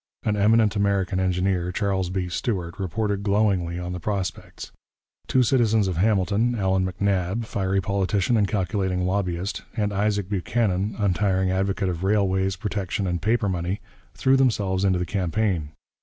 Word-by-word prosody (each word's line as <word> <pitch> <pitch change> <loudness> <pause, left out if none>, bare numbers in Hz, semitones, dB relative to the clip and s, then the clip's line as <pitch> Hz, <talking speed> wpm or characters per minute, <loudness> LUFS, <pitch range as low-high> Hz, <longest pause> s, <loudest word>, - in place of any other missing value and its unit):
An 105 - +1
eminent 105 +1 +3
American 100 -2 +1
engineer, 90 -1 0
Charles 95 -2 -1
B. 95 -1 -2
Stuart, 90 -2 -3
reported 100 +2 -1
glowingly 100 -4 +1
on 90 0 -4
the 90 - -4
prospects. 100 0 -4 0.6
Two 130 - +3
citizens 110 -5 +3
of 90 -3 -2
Hamilton, 105 +4 +2
Allan 95 -3 +1
MacNab, 95 +3 -1
fiery 95 -2 -1
politician 100 +3 0
and 105 -3 +3
calculating 95 -2 -1
lobbyist, 95 0 -2 0.2
and 105 -1 0
Isaac 100 -1 0
Buchanan, 100 0 0
untiring 95 -2 +1
advocate 95 +1 0
of 90 0 -4
railways, 95 -1 +1
protection, 100 0 -3
and 90 -2 -2
paper 110 +2 +1
money, 90 +1 -2 0.4
threw 130 0 +3
themselves 105 -8 +1
into 95 -2 +3
the 90 - -1
campaign. 90 -3 -1
95 Hz, 145 wpm, -24 LUFS, 90-105 Hz, 0.6 s, eminent